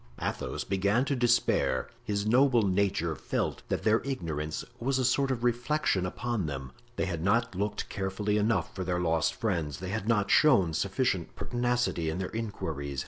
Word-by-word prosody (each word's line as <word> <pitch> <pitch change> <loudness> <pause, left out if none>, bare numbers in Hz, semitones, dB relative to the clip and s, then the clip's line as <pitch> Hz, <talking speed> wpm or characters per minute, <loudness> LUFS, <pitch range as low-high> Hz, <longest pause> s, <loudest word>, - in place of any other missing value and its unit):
Athos - - -3
began 100 +6 +1
to 140 - 0
despair. 120 -1 +2 0.2
His 100 0 -1
noble 125 +1 +4
nature 95 -4 +1
felt 65 - -2
that - - -1
their 110 +1 +3
ignorance 80 - -3
was 135 +3 0
a 130 - +1
sort 135 +2 +2
of 125 -3 -2
reflection 120 -5 +1
upon 115 -2 -2
them. 65 -3 -5 0.2
They - - 0
had 85 -4 -3
not 115 +4 +2
looked 100 +3 -2
carefully 100 +2 -1
enough 105 -5 +1
for 95 - -4
their 90 0 -1
lost 80 -3 +1
friends. 85 - -1
They 95 +1 -6
had 105 +1 -3
not 105 -3 +2
shown 100 - +5
sufficient 95 0 -1
pertinacity 120 -8 0
in 80 - -3
their 95 -1 -3
inquiries. 80 - -4
100 Hz, 170 wpm, -29 LUFS, 85-120 Hz, 0.2 s, shown